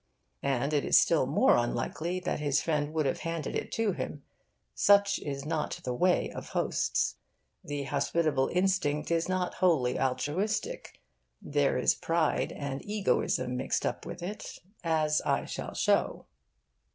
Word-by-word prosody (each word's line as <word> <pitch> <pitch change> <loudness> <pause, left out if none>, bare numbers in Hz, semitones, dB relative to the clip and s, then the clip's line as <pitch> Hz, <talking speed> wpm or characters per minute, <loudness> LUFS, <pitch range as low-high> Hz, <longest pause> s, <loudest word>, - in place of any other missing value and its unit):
And 140 +2 0
it 145 - +2
is - - +6
still - - +3
more - - +4
unlikely 140 +9 -1
that 180 - -2
his 145 -1 +1
friend 150 -2 -1
would 155 -1 0
have 135 - 0
handed 165 -1 -3
it - - -3
to 225 -2 +1
him. 145 -5 -5 0.5
Such 200 -1 +4
is 140 -1 -5
not 155 -1 -2
the 125 - -2
way 180 +8 +2
of - - -8
hosts. - - 0 0.5
The 145 -1 -4
hospitable 145 0 +1
instinct 180 -5 +1
is 165 +1 +1
not 185 -1 0
wholly 155 -10 +2
altruistic. 145 +12 -2 0.4
There 145 -2 +1
is 125 - +3
pride 165 -1 0
and 140 -1 -5
egoism 200 -10 0
mixed 130 - -1
up - - -2
with 175 - -7
it, 200 +4 -6 0.3
as 155 -2 +2
I - - 0
shall - - -6
show. - - +1
155 Hz, 150 wpm, -29 LUFS, 140-180 Hz, 0.5 s, is